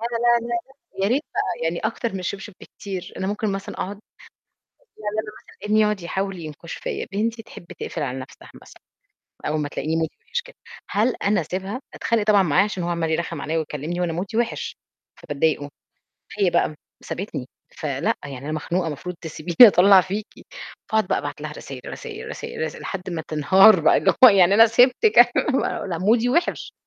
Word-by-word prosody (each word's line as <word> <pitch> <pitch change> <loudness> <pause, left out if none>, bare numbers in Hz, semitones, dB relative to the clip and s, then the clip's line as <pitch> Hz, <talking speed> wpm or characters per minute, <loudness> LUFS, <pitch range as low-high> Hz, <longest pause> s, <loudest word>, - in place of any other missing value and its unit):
لأ، 230 - -2
لأ، 235 0 +2
لأ، 240 0 0 0.5
يا - - +2
ريت 265 +6 +1
بقى 235 - -2
يعني 165 +1 -1
أكتر 230 +1 -2
من 195 - -4
الشبشب 195 +2 -5
بكتير، 190 -3 -8
أنا 190 - -3
ممكن 210 0 -1
مثلًا 195 0 -5
أقعد 200 +2 -5 1.0
يعني 210 -1 -4
أنا 210 - -8
مثلًا - - -19
ابني 215 - +4
يقعد 210 -2 +2
يحاول 190 +1 -3
ينكُش 155 +1 -8
فيّا، - - -4
بنتي 225 +3 -1
تحب 175 - -13
تقفل 160 - -4
على 130 -2 -3
نَفْسها 130 - -12
مثلًا - - -17 0.6
أول 155 0 0
ما 145 - -2
تلاقيني 155 +2 -2
مودي 160 -1 -2
وحِش 475 - -3
كده. - - -16 0.3
هل 225 +5 +2
أنا 200 -1 +3
أسيبها؟ 190 - -4
أتخانق 230 -2 0
طبعًا 205 -2 +5
معاه، 180 +3 +3
عشان 205 -3 -4
هو 170 - -2
عمّال 170 -2 -1
يرخّم 165 +1 -2
عليّا 160 +2 -1
ويكلمني 155 +3 -4
وأنا 175 -2 0
مودي 185 +6 -4
وحِش، 235 0 -2 0.4
فبضايقُه. 145 0 -1 0.7
هي - - +3
بقى - - +1 0.3
سابتني - - -5 0.3
فلأ، - - -1
يعني: 135 -2 -7
"أنا 145 +4 -6
مخنوقة 170 +4 -1
المفروض 165 +4 -5
تسيبيني 160 +1 -6
أطلّع 195 -3 +8
فيكِ." 200 +4 -4 0.6
فأقعد 220 -3 +1
بقى - - +1
أبعت - - -6
لها - - -5
رسايل، - - -9
رسايل، 455 -2 -7
رسايل 465 +1 -7
رساي - - -4
لحد 190 -1 -5
ما 165 -2 -3
تنهار 190 +6 +6
بقى 155 - +4
اللي - - +3
هو: - - +13
"يعني 195 -3 +5
أنا 225 +2 +8
سيبتِك 250 - +4 0.2
أنا - - +2
ما" 270 - -1
"أنا 175 -4 -3
مودي 225 +6 +3
وحش." 340 +8 0
195 Hz, 190 wpm, -23 LUFS, 165-225 Hz, 1.0 s, هو